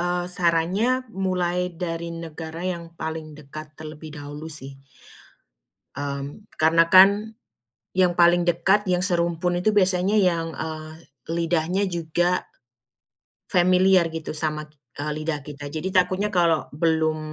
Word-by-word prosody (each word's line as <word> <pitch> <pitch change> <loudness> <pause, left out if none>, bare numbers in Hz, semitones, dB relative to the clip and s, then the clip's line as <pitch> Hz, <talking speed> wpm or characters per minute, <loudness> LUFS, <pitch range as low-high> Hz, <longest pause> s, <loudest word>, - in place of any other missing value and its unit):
eee, 175 0 0
sarannya 185 +10 +1
mulai 180 -3 -1 0.2
dari 170 -1 -4 0.2
negara 160 +1 -7
yang 175 -2 -3 0.2
paling 160 -1 -5
dekat 150 +1 -10
terlebih 155 0 -9
dahulu 145 +2 -8
sih. 145 -4 -9 1.3
Mmm, 140 +7 -5 0.2
karena 165 +1 +5
kan, 190 +1 +10 0.9
yang 180 -2 +3
paling 175 0 +5
dekat 185 +5 +2
yang 180 - +2
serumpun 175 0 0
itu 215 - +3
biasanya 185 +1 +3
yang, 170 -4 +2
eee, 155 0 -6 0.4
lidahnya 170 +3 0
juga 175 +1 0 1.1
familiar 185 0 +4
gitu 160 -1 -4
sama 155 0 -2
kit 150 - -32 0.4
lidah 155 -1 -2
kita. 145 -1 -8
Jadi 160 +4 -3
takutnya 185 +3 +2
kalau 170 -3 +2
belum, 160 -1 +1
170 Hz, 120 wpm, -24 LUFS, 155-180 Hz, 1.3 s, kan